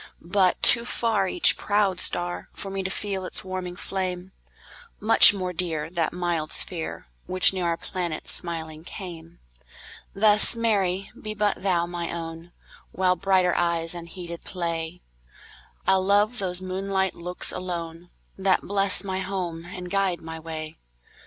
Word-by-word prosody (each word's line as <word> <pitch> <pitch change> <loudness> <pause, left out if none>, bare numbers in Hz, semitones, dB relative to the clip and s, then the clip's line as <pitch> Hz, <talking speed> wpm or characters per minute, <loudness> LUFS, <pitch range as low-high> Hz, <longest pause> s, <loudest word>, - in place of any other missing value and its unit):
But 190 -3 +4
too 235 - +9
farEach 230 - +1
proud 205 -3 +1
star, 175 0 0
For 195 - -6
me 195 0 -2
to 190 - -3
feel 195 -1 -3
its 185 - -3
warming 185 -1 -5
flame; 185 -1 -4 0.7
Much 220 +2 +8
more 185 -3 -3
dear, 165 -3 -2
That 170 -3 0
mild 175 -3 -2
sphere, 160 - -3 0.2
Which 185 +1 +4
near 185 -2 -1
our 170 -1 0
planet 175 -4 -4
smiling 160 -2 -2
came; 170 -2 -9 0.8
Thus, 210 +2 +6
Mary, 195 -5 0
be 215 0 -5
but 205 -1 0
thou 180 -3 +1
my 175 -1 -4
own; 165 0 -6 0.4
While 185 -1 +2
brighter 185 0 +2
eyes 170 -1 0
unheeded 170 0 -7
play, 170 -1 -4 0.8
I'll 190 -1 +3
love 205 +5 +3
those 185 -1 -2
moonlight 190 0 -1
looks 180 +1 -4
alone, 175 -1 -5 0.3
That 190 -1 +2
bless 200 0 +1
my 190 -1 -3
home 180 -4 -4
and 180 0 -8
guide 195 -3 +1
my 160 0 -7
way. 160 -1 -7
180 Hz, 140 wpm, -25 LUFS, 170-195 Hz, 0.8 s, too